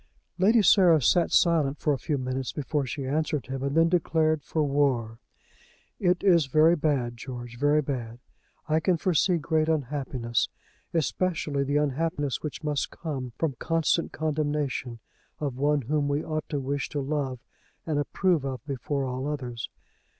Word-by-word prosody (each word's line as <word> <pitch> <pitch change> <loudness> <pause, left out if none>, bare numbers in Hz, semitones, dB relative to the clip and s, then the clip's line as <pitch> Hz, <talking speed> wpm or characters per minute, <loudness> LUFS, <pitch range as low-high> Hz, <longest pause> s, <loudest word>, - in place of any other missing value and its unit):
Lady 215 +4 +5
Sarah 180 -3 +6
sat 170 +6 +3
silent 155 -5 +3
for 150 - +1
a 135 - -3
few 150 - -1
minutes 130 -1 -3
before 145 -1 -2
she 135 +2 -4
answered 150 +1 -1
him, 130 +1 -5
and 140 +3 -1
then 165 0 +6
declared 160 -3 +1
for 155 +2 -1
war. 135 -6 0 0.8
"It 180 -2 +1
is 170 -7 +4
very 155 +5 +5
bad, 140 -7 0
George; 120 -1 -7
very 145 +2 +3
bad. 120 -5 -4 0.5
I 155 0 +2
can 175 +2 +2
foresee 180 +1 +2
great 160 0 0
unhappiness; 130 -6 -1 0.4
especially 160 -3 0
the 145 +1 0
unhappiness 150 0 -1
which 150 +1 -6
must 150 -2 -1
come 135 -7 -5
from 160 -4 0
constant 165 0 +1
condemnation 150 -5 -2 0.4
of 140 -4 -2
one 145 0 +1
whom 145 +3 0
we 145 +2 0
ought 155 -1 -3
to 145 - -1
wish 140 +1 -2
to 145 - -3
love 140 -2 -2 0.5
and 155 -3 0
approve 170 +2 +1
of 130 -3 -5
before 140 0 -2
all 130 +2 -3
others. 125 -6 -4
145 Hz, 155 wpm, -27 LUFS, 135-160 Hz, 0.8 s, Sarah